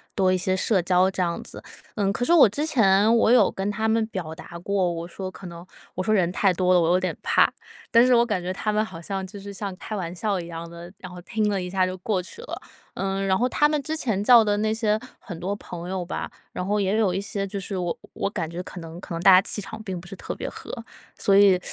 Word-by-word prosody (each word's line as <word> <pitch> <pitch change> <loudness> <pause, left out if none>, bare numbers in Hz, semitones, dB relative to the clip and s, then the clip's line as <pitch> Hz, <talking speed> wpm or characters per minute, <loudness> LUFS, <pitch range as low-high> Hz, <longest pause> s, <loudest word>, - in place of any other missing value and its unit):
多 185 -2 +3
一 185 - +2
些 185 +1 0
社 190 -1 +2
交 185 +1 +3
这 190 - -2
样 170 -1 -1
子。 - - -9 0.3
嗯， 200 -2 0
可 245 - -1
是 340 - +3
我 295 -11 +8
之 290 +9 -1
前 215 -6 +4
我 230 - +4
有 250 - +5
跟 195 +1 -3
他 220 +2 -1
们 225 0 +2
表 175 -7 -5
达 170 +1 -10
过， 185 0 0
我 170 0 -5
说 185 +1 -6
可 190 - -12
能 170 -1 -9 0.3
我 185 - -3
说 215 - 0
人 180 -4 +3
太 195 0 +2
多 185 +1 +2
了， 175 - +5
我 165 - +2
有 180 +1 +4
点 185 - -2
怕。 - - +3 0.4
但 235 0 +7
是 250 0 +5
我 235 0 +4
感 210 -6 -1
觉 180 +1 -3
他 210 +3 -2
们 215 - +2
好 185 -6 -8
像 190 +2 -4
就 200 +2 -10
是 200 +1 -8
像 195 -1 -5
开 215 - -6
玩 175 -4 -4
笑 200 0 -1
一 170 - -7
样 170 0 -7
的， 170 +1 -10
然 185 -2 -10
后 180 - -9
听 215 +4 -1
了 200 -2 0
一 180 - -5
下 185 0 +2
就 185 0 -3
过 195 0 0
去 455 - -8
了。 485 - -7 0.4
嗯， 195 0 -2
然 190 -1 +2
后 250 +2 +1
他 295 - +3
们 300 -1 0
之 315 +3 -3
前 210 -9 -1
叫 235 -1 +7
的 205 -1 +1
那 215 +1 0
些 220 -1 +1 0.2
很 175 -6 -9
多 200 +3 -2
朋 175 -3 -8
友 185 -2 -3
吧， - - -4 0.2
然 - - -4
后 205 +2 0
也 195 +1 +1
有 210 -5 +2
一 185 - -1
些， 200 0 -3
就 200 +1 -4
是 195 +1 -5
我 175 -2 -2 0.2
我 - - -2
感 170 -6 -4
觉 170 +2 -5
可 180 - -9
能 165 +1 -9
可 170 - -6
能 - - -3
大 190 - +7
家 185 - +8
气 210 - -3
场 220 +3 -7
并 190 -4 -5
不 175 - -11
是 195 - -7
特 - - -6
别 - - -5
合。 - - -8 0.5
所 195 - +3
以 195 -2 +6
195 Hz, 300 characters per minute, -24 LUFS, 180-215 Hz, 0.5 s, 我